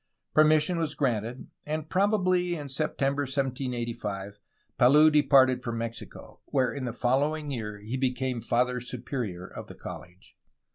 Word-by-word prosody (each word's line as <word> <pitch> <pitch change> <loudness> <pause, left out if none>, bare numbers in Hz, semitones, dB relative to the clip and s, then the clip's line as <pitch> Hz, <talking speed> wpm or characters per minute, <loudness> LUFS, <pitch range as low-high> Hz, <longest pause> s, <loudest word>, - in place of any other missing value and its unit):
Permission 155 +2 +4
was 155 -2 -2
granted, 120 -2 -2
and 155 +1 -3
probably 185 -2 +2
in 145 -3 -6
September 140 0 0
1785 120 -7 -3 0.4
Palou 150 +5 +7
de 150 0 +5
parted 130 -3 +4
for 120 - -3
Mexico, 115 0 -7
where 130 -2 0
in 140 -3 -4
the 120 - -2
following 145 +5 0
year 105 -5 -4
he 110 +5 -5
became 130 -1 -1
Father 125 +2 +1
Superior 120 -7 -5
of - - -9
the - - -11
college. 90 +2 -11
130 Hz, 140 wpm, -28 LUFS, 120-150 Hz, 0.4 s, Palou